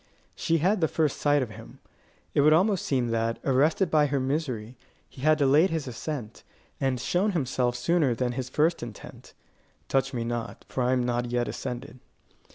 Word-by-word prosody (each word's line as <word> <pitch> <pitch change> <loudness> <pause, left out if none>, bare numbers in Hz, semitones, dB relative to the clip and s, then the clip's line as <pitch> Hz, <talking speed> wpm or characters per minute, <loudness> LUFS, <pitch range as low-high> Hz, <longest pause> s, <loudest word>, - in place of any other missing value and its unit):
She 165 - 0
had 185 +5 +1
the 160 - +4
first 155 -2 0
sight 145 -2 +3
of 115 - -7
him. - - -12 0.6
It - - +3
would 155 +2 +6
almost 190 +3 +2
seem 125 -4 +1
that, 115 0 0
arrested 150 +7 +2
by 150 -2 +4
her 140 0 0
misery, 130 -4 -2 0.3
he 130 - -14
had 155 +2 +4
delayed 145 +5 +4
his 160 -4 -3
ascent, 125 -2 -6 0.4
and 135 -2 0
shown 190 - 0
himself 130 -5 0
sooner 135 0 +1
than 125 +1 -1
his 125 0 -4
first 160 +5 +1
intent. 115 -4 -10 0.5
"Touch 135 0 +1
me 120 -3 -3
not, 115 0 -5
for 130 - -3
I 125 +1 +2
am 125 -1 +1
not 120 0 0
yet 120 0 0
ascended." 130 +1 -6
135 Hz, 180 wpm, -27 LUFS, 120-155 Hz, 0.6 s, would